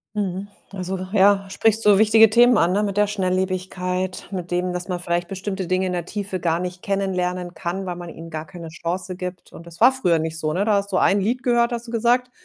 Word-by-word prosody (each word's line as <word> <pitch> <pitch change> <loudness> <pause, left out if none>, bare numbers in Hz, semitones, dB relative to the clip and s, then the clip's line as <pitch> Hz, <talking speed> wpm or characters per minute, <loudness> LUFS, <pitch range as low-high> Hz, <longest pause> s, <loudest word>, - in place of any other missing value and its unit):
Mhm, 195 -1 -3 0.2
also 190 0 -4 0.2
ja. 195 0 +4
Sprichst 225 +2 +2
so 205 -1 +5
wichtige 220 0 +6
Themen 240 0 +6
an, 175 -1 +3
ne, 205 +2 +1
mit 200 -1 -2
der 210 - +4
Schnelllebigkeit, 185 -1 -2
mit 180 -2 -5
dem, 180 0 -1
dass 180 +1 -4
man 180 -1 -3
vielleicht 175 0 -1
bestimmte 190 -1 -4
Dinge 185 +1 +1
in 185 - -2
der 175 -2 -3
Tiefe 200 -1 -4
gar 165 0 0
nicht 180 0 -5
kennenlernen 180 -3 -2
kann, 190 +2 -4
weil 180 -1 -4
man 175 -1 -8
ihnen 165 0 -10
gar 155 0 -6
keine 170 -2 -9
Chance 180 +3 -4
gibt 180 0 -7
und 170 - -12
das 170 0 -12
war 250 +4 +7
früher 180 -11 +1
nicht 160 0 -3
so, 155 -1 -1
ne? 195 +5 0
Da 215 - +2
hast 200 0 0
du 185 - +1
ein 200 +1 +3
Lied 240 +5 -1
gehört, 240 0 +2
hast 235 0 -3
du - - -8
gesagt, 240 +2 +1
185 Hz, 235 wpm, -22 LUFS, 180-205 Hz, 0.2 s, war